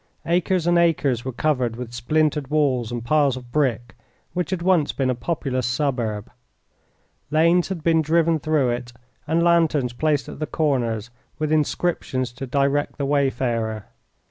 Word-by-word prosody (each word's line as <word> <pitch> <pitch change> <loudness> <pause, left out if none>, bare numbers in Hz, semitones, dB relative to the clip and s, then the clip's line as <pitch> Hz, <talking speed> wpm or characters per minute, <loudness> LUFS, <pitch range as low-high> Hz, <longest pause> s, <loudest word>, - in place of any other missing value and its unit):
Acres 175 0 +1
and 175 0 +4
acres 145 -8 +2
were 130 - -3
covered 125 -3 0
with 120 0 -7
splintered 150 +3 0
walls 135 -6 +1
and 120 -1 -4
piles 140 -1 +2
of 125 -1 -11
brick 120 -5 0 0.4
which 180 -1 -2
had 185 -3 -2
once 175 -5 +3
been 130 -2 0
a - - +1
populous 130 -2 -2
suburb. 120 -5 -2 1.0
Lanes 170 +3 +3
had 185 -5 -5
been 165 -1 +3
driven 165 +1 +2
through 150 -4 +1
it 120 0 -4 0.4
and 165 +2 +2
lanterns 160 -7 +2
placed 150 +2 0
at - - -9
the 155 - -2
corners 125 -7 -1 0.3
with 155 0 -2
inscriptions 150 -5 0
to 135 +2 -7
direct 140 +2 0
the 140 - -1
wayfarer. 120 -6 0
140 Hz, 155 wpm, -23 LUFS, 125-155 Hz, 1.0 s, and